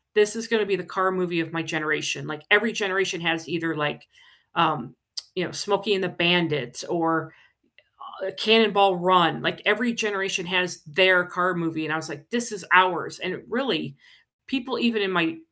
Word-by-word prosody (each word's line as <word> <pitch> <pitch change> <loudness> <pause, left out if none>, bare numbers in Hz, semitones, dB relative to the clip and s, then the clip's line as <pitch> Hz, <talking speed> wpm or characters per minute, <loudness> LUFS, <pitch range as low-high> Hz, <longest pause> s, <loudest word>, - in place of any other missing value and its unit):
"This 210 0 +3
is 225 0 -6
gonna 225 -2 +1
be 200 - 0
the 180 - -6
car 190 +1 -1
movie 180 -2 -2
of 160 - -7
my 165 - -2
generation." 155 -3 -2
Like 150 0 -8
every 210 +2 +6
generation 195 -4 -1
has 165 -1 -1
either, 165 -2 -3
like, 150 -1 -4 0.5
um, - - 0 0.4
you 185 - -2
know, 170 - -6
Smokey 200 +6 -1
and 190 -1 -1
the 180 - -1
Bandits 165 -8 +1
or, 165 -1 -1 0.9
uh, - - -5
Cannonball 205 -3 +5
Run, 180 -2 +3
like 165 0 -2
every 220 +4 +2
generation 195 -4 -2
has 180 -1 -1
their 180 +3 +5
car 180 +1 0
movie, 165 -2 -3
and 155 - -2
I - - +1
was 160 0 -6
like, 150 +1 -12
"This 235 -1 -3
is 205 -5 -9
ours." 180 -2 +4
And 185 - -4
it - - -11
really 260 +4 -2 0.5
people 265 -1 -4
even 230 -3 +1
in 190 - -1
my 165 -2 0
180 Hz, 185 wpm, -24 LUFS, 165-200 Hz, 0.9 s, every